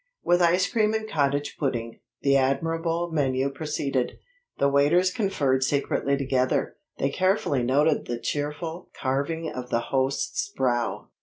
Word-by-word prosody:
With 175 +1 +3
ice 175 +2 +4
cream 220 -2 +1
and 220 0 -2
cottage 145 -5 0
pudding, 120 -5 -2 0.2
the 140 -1 +4
admirable 165 +5 0
menu 135 -3 +1
proceeded. 140 -3 -2 0.4
The 140 - +3
waiters 150 +7 +3
conferred 140 - +1
secretly 140 0 0
together. 130 -2 0 0.2
They 135 - 0
carefully 185 - +1
noted 145 +5 +2
the 120 - -2
cheerful 150 +6 -4
carving 145 +5 -1
of 125 -1 -6
the 115 - +1
host's 135 +4 0
brow. 120 -3 0
140 Hz, 135 wpm, -26 LUFS, 130-165 Hz, 0.4 s, ice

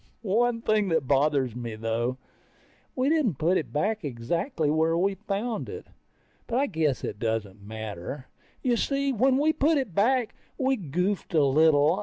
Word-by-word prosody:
One 230 +3 +1
thing 215 -2 +2
that 160 -4 +1
bothers 140 -3 +2
me 120 -2 -5
though, 115 +3 -2 0.8
we 255 +1 +1
didn't 285 - +2
put 170 +5 +2
it 165 - -2
back 210 +8 -1
exactly 155 - -2
the 145 - +2
way 160 +1 +2
we 190 +4 +1
found 210 +3 -3
it. 445 +1 -7 0.6
But 235 - -1
I 275 - +3
guess 155 - -1
it - - -4
doesn't 110 -3 -2
matter. 110 +4 -7 0.4
You 245 -2 +2
see, 275 +2 0
when 260 +3 +3
we 305 +3 +3
put 310 +2 +2
it 260 -10 -2
back, 235 +5 +2 0.2
we 265 0 +2
goofed 180 - -2
a 155 - +5
little. 155 +4 +4
170 Hz, 170 wpm, -27 LUFS, -, 0.8 s, a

